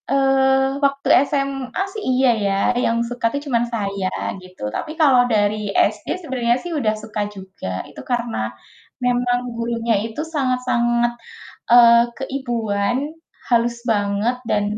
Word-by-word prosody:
Eee, 270 Hz, 0 st, +3 dB, 0.2 s
waktu 275 Hz, 0 st, -1 dB, 0.2 s
SMA 275 Hz, 0 st, -2 dB
sih 430 Hz, -, -5 dB
iya 255 Hz, 0 st, +3 dB, 0.2 s
ya, 200 Hz, -, +1 dB, 0.3 s
yang 230 Hz, -, +1 dB
suka 245 Hz, -1 st, -4 dB
tuh 285 Hz, -, -2 dB
cuman 240 Hz, -4 st, +1 dB
saya, 200 Hz, -4 st, -2 dB, 0.3 s
gitu. 185 Hz, 0 st, -16 dB
Tapi -, -, -4 dB
kalau 265 Hz, -5 st, +6 dB
dari 210 Hz, -1 st, +1 dB, 0.2 s
SD 210 Hz, -1 st, -18 dB
sebenarnya 250 Hz, -6 st, 0 dB
sih 350 Hz, -, -5 dB
udah 235 Hz, -9 st, +1 dB
suka 215 Hz, 0 st, -5 dB
juga, 190 Hz, -, -7 dB
itu -, -, -10 dB
karena 240 Hz, -1 st, -1 dB, 0.7 s
memang 245 Hz, 0 st, +2 dB, 0.2 s
gurunya 230 Hz, 0 st, -1 dB
itu 225 Hz, +6 st, -5 dB
sangat-sangat, 240 Hz, -3 st, +1 dB, 0.6 s
eee, 235 Hz, -1 st, +8 dB, 0.2 s
keibuan, 240 Hz, -5 st, -1 dB, 0.5 s
halus 235 Hz, 0 st, +2 dB
banget 205 Hz, +3 st, 0 dB
dan 205 Hz, -, +2 dB
240 Hz, 130 wpm, -21 LUFS, 215-265 Hz, 0.7 s, eee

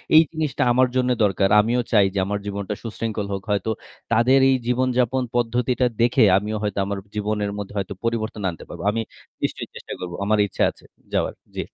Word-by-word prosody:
এই 160 Hz, -, +10 dB
জিনিসটা 155 Hz, -5 st, -1 dB
আমার 130 Hz, +1 st, +4 dB
জন্যে 125 Hz, -1 st, +2 dB
দরকার। 95 Hz, -1 st, +2 dB
আমিও 120 Hz, +3 st, +1 dB
চাই 105 Hz, -3 st, +5 dB
যে 100 Hz, -, 0 dB
আমার 105 Hz, +1 st, -2 dB
জীবনটা 100 Hz, 0 st, -3 dB
সুশৃঙ্খল 110 Hz, -2 st, -3 dB
হোক। 95 Hz, -, -3 dB
হয়তো 105 Hz, +2 st, 0 dB, 0.4 s
তাদের 125 Hz, +4 st, +5 dB
এই 130 Hz, -, +4 dB
জীবনযাপন 125 Hz, 0 st, +1 dB
পদ্ধতিটা 120 Hz, +1 st, +1 dB, 0.2 s
দেখে 120 Hz, 0 st, +4 dB
আমিও 105 Hz, +2 st, -2 dB
হয়তো 100 Hz, -1 st, -1 dB
আমার 100 Hz, 0 st, -3 dB, 0.2 s
জীবনের 105 Hz, -1 st, -1 dB
মধ্যে 105 Hz, 0 st, -6 dB
হয়তো 100 Hz, 0 st, -2 dB
পরিবর্তন 110 Hz, -2 st, -2 dB
আনতে 85 Hz, -, -8 dB
পারব। -, -, -8 dB
আমি 115 Hz, +1 st, -1 dB, 0.4 s
নিশ্চয়ই -, -, -2 dB
চেষ্টা -, -, -7 dB
করবো, 90 Hz, -1 st, -5 dB
আমার 105 Hz, +1 st, +3 dB
ইচ্ছা -, -, -1 dB
আছে -, -, -23 dB, 0.3 s
যাওয়ার। -, -, +1 dB, 0.2 s
জী। -, -, -4 dB
110 Hz, 185 wpm, -23 LUFS, 100-125 Hz, 0.4 s, এই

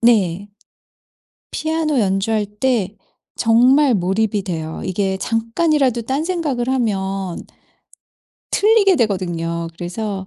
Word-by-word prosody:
네. 200 Hz, -5 st, +2 dB, 1.0 s
피아노 315 Hz, -3 st, 0 dB
연주할 205 Hz, +1 st, +1 dB
때 210 Hz, -2 st, -1 dB, 0.4 s
정말 250 Hz, +4 st, +4 dB
몰입이 200 Hz, +2 st, 0 dB
돼요. 160 Hz, -4 st, -5 dB
이게 190 Hz, +1 st, -1 dB
잠깐이라도 240 Hz, -, +1 dB
딴 270 Hz, +7 st, -2 dB
생각을 300 Hz, -9 st, -1 dB
하면 195 Hz, -7 st, -1 dB, 1.1 s
틀리게 410 Hz, -3 st, +4 dB
되거든요. 170 Hz, -, -1 dB
그래서 190 Hz, +2 st, -4 dB
220 Hz, 220 characters per minute, -19 LUFS, 190-260 Hz, 1.1 s, 정말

